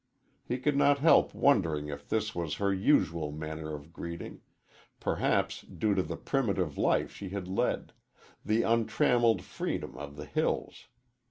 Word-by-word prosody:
He 125 - -2
could 145 +3 0
not 145 0 +4
help 160 +4 +5
wondering 80 - +2
if 70 -1 -8
this 110 -1 0
was 85 -3 -2
her 100 -1 +1
usual 85 - +2
manner 80 +1 -5
of 75 +3 -12
greeting 85 -1 -7 0.6
perhaps - - 0
due 105 -2 -1
to 95 - +2
the 85 -1 -5
primitive 100 - -1
life - - +1
she 100 - -7
had 95 -1 -5
led 95 - -1 0.5
the 110 +2 +2
untrammeled 115 0 +3
freedom 65 - -4
of 70 +2 -8
the 75 0 -7
hills. - - -2
95 Hz, 150 wpm, -30 LUFS, 80-115 Hz, 0.6 s, help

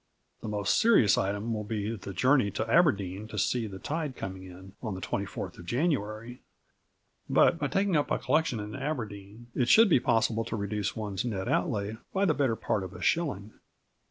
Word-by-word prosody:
The - - -6
most 105 -2 +1
serious 215 - +5
item 105 +4 -1
will 105 -1 -3
be 105 +1 -3
the 100 -1 -8
journey 125 +3 +3
to 110 +3 -3
Aberdeen 105 - +2
to 110 - -8
see 115 +3 0
the 95 -2 -8
tide 150 +4 -3
coming 95 -1 -6
in 95 +1 -12
on 110 -5 -4
the - - -6
24th 95 -1 -4
of 85 - -11
January; 120 - -2 0.9
but, - - +4
by - - 0
taking 195 -2 +1
up 145 - +1
a - - +1
collection 145 -3 +1
in 105 0 -6
Aberdeen, 115 -6 -5
it 120 -2 0
should 225 -1 +7
be 155 - +5
possible 115 -2 +1
to - - -4
reduce 105 -1 -2
one's 105 -4 -3
net 100 -6 -3
outlay 110 - -1 0.2
by 195 +1 +3
the 165 - +3
better 135 -6 +1
part 105 -2 -1
of 95 0 -7
a - - -9
shilling. 110 - 0
110 Hz, 190 wpm, -29 LUFS, 100-130 Hz, 0.9 s, should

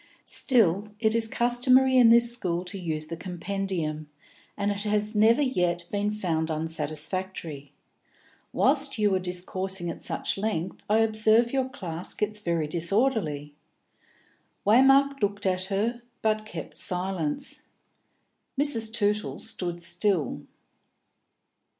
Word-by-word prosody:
"Still, 210 - +1
it 220 -1 +2
is 230 -1 +2
customary 255 +3 +3
in 245 -3 +7
this 235 0 +6
school 180 -6 -1
to 195 +2 -4
use 155 -3 -3
the 165 +2 -6
compendium, 175 -4 -4 0.5
and 205 0 0
it 200 - -3
has 210 +1 -1
never 225 +6 +4
yet 175 -9 0
been 205 0 0
found 170 -6 -2
unsatisfactory. 155 -1 -3 0.8
Whilst 275 -1 +2
you 210 -2 +2
are 190 - +2
discoursing 185 0 -2
at - - -10
such - - -2
length, 190 -4 -3
I 220 +1 +4
observe 220 +2 +3
your 265 -1 0
class 175 -8 -5
gets 210 0 -1
very 170 -5 -1
disorderly." 170 - 0 1.1
Waymark 270 +5 +5
looked 205 0 -1
at 185 -1 +1
her, 215 +5 -1 0.2
but 215 0 0
kept 165 -7 -8
silence. 185 - -2 0.9
Mrs. 230 -7 +1
Tootle 210 -2 +1
stood 175 -6 -5
still. 175 - 0
200 Hz, 120 wpm, -26 LUFS, 170-225 Hz, 1.1 s, in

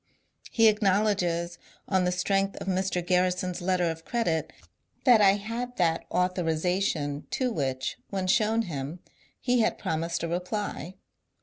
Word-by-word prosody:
He 225 -2 +4
acknowledges, 195 -5 +1 0.3
on 190 -2 +2
the 180 - +1
strength 195 +2 0
of - - -6
Mr. 185 -2 -1
Grarrison's 180 0 +1
letter 180 -1 +1
of 165 0 -9
credit, 165 -10 -1 0.5
that 240 -5 +7
I 195 -1 +7
had 230 +5 -4
that 165 -2 +1
authorization 175 -4 0
to 255 -2 0
which, 130 - -2
when 190 -2 -2
shown 220 +3 +2
him, 155 -2 -5 0.4
he 250 -1 +1
had 225 - +2
promised 165 +2 -2
a - - 0
reply. 180 0 -3
180 Hz, 135 wpm, -27 LUFS, 170-205 Hz, 0.5 s, that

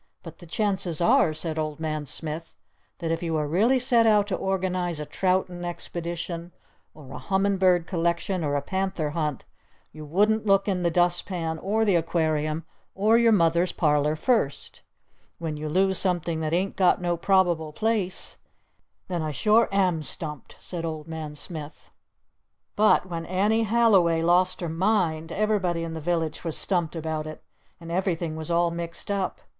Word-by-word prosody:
But 165 -3 -11
the 175 - -13
chances 190 -3 -1
are," 170 -2 +4
said 155 0 -3
Old 155 -1 -3
Man 155 -2 -3
Smith, 160 +3 -5 0.4
"that 165 -2 -3
if 165 - -1
you 165 -2 -1
really 190 - +2
set 240 -2 +4
out 210 -2 +4
to 190 - 0
organize 185 -3 -1
a 150 - -4
troutin' 180 +2 -1
expedition 170 0 -5 0.4
or 145 -4 -13
a 130 - -7
hummin' 195 +7 +1
bird 180 -2 +3
collection 170 +1 -1
or 145 -1 0
a 140 - -1
panther 190 -4 -2
hunt 150 -4 -3 0.5
you 155 - -10
wouldn't 210 +8 +1
look 195 0 +3
in 190 -3 0
the 170 - +2
dust 175 +1 +1
pan 165 -4 -3
or 215 +5 0
the 200 - +3
Aquarium 160 -2 0 0.3
or 215 +4 +3
your 235 0 +5
Mother's 170 -2 +3
parlor 150 -2 +1
first! 155 - -1 0.6
When 160 -2 -4
you 150 +1 -5
lose 190 +3 +2
something 175 -3 -1
that 155 -1 -2
ain't 185 +4 0
got 185 -2 +3
no 175 -1 0
Probable 170 -3 +2
Place 205 0 -2 0.7
then 175 -3 -2
I 155 - -2
sure 215 +9 +3
am 185 -5 +2
stumped!" 150 -1 -4
said 175 -2 -5
Old 155 -2 -5
Man 160 -2 -6
Smith. 150 0 -7 0.8
But 210 -3 +4
when 170 -3 -5
Annie 210 +5 +2
Halliway 195 -8 +3
lost 180 +2 +2
her 175 - -2
mind, 165 -2 0
everybody 190 -4 0
in 165 -1 -5
the 160 - -5
village 165 -1 -1
was 165 -3 -3
stumped 175 -4 0
about 160 -1 -3
it. 155 - -9 0.4
And 165 -1 -9
everything 170 -3 -1
was 160 0 -5
all 170 0 +2
mixed 170 +3 -5
up. 195 -2 -2
170 Hz, 170 wpm, -25 LUFS, 160-190 Hz, 0.8 s, your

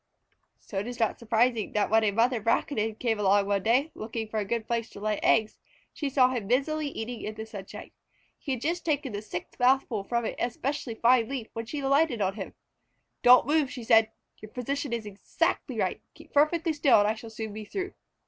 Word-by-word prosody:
So 195 - -5
it 205 - -4
is 245 -1 -6
not 225 -2 0
surprising 230 -1 +1
that 210 0 +1
when 220 0 +5
a 215 - +3
mother 230 +3 +1
Braconid 225 -1 0
came 225 -3 -1
along 200 0 +3
one 200 -1 0
day, 255 +9 +2
looking 220 0 -5
for 215 0 -2
a 205 - -2
good 225 +2 -2
place 230 -1 -2
to - - -11
lay 210 0 -1
eggs, 220 -1 +2 0.3
she 290 - -3
saw 255 -2 +4
him 235 -6 -3
busily 290 +6 +1
eating 240 -3 -5
in 215 - -5
the 220 0 -6
sunshine. 200 -3 -9 0.5
He 275 - -3
had 250 - -4
just 340 +4 -1
taken 290 -6 -1
the 205 - -3
sixth 180 -4 -7
mouthful 250 -4 +2
from 235 +2 -1
an - - -2
especially 245 0 -2
fine 235 0 +3
leaf 260 -5 -4
when 230 0 -5
she 290 +4 -4
alighted 275 -2 +2
on 195 -1 +1
him. 195 -2 -7 0.7
"Don't 250 0 +7
move!" 295 -1 +1
she 245 - -7
said. 225 -1 +5 0.3
"Your 215 - -10
position 275 +4 -3
is 230 -2 -3
exactly 205 -1 -2
right. - - -1
Keep - - -16
perfectly 320 +3 +3
still 290 -4 +4
and 205 0 +4
I 215 - +2
shall 225 +1 -10
soon 220 -1 -6
be 215 +1 -6
through." 380 - -5
230 Hz, 215 wpm, -28 LUFS, 215-270 Hz, 0.7 s, Don't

